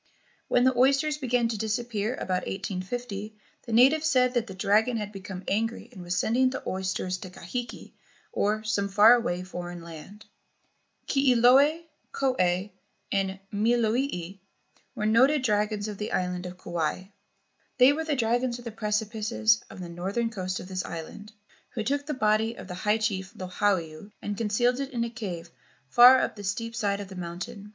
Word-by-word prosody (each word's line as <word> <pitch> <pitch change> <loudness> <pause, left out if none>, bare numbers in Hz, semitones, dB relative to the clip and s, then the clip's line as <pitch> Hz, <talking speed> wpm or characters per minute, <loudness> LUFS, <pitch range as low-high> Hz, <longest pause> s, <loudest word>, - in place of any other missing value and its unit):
When 245 - +3
the 260 0 +3
oysters 275 +4 +3
began 245 -3 +1
to 220 -3 -3
disappear 220 +1 -2
about 185 -5 -2
1850, 200 +3 -5 0.3
the - - -5
natives 275 +7 +5
said 250 -4 +3
that 240 -2 0
the 190 - -8
dragon 215 +5 +2
had 210 -1 -4
become 195 -2 -8
angry 225 +3 -1
and 185 - -11
was 175 +1 -3
sending 250 +7 +2
the 260 - -5
oysters 185 -1 -2
to 185 - -8
Kahiki, 235 +7 -7 0.4
or 215 +1 0
some 205 -2 -1
far 210 +4 +7
away 185 -7 0
foreign 175 -1 -7
land. 170 +6 -11 0.8
Kilioe, 270 +4 +4 0.3
Koe, 270 -1 0 0.8
and 195 -1 -1
Milolii 220 -3 0 0.6
were 210 - -2
noted 260 +6 +4
dragons 210 -2 0
on 210 -2 -6
the 210 - -4
island 180 0 -1
of 180 0 -9
Kauai. 175 0 -2 0.7
They 255 +2 +7
were 320 +2 -2
the 310 -2 -1
dragons 240 0 0
of 245 - -13
the 230 - -4
precipices 220 +1 0
of - - -11
the 175 - -6
northern 195 +7 -2
coast 185 -3 -3
of - - -9
this 185 -1 -3
island, 190 +6 -8 0.4
who 220 - -1
took 285 +4 -1
the 300 - -2
body 220 0 +1
of - - -10
the 180 - -6
high 210 +4 +1
chief 195 -4 -2
Lohiau 185 -1 -2
and 205 - -4
concealed 235 +4 +1
it 275 -1 -3
in 240 -4 -2
a 235 - -4
cave 180 -7 -6 0.4
far 245 - +8
up - - -2
the 205 - -8
steep 230 +4 -3
side 205 -3 0
of 200 -2 -7
the 190 - -9
mountain. 185 +5 -7
215 Hz, 170 wpm, -27 LUFS, 190-245 Hz, 0.8 s, far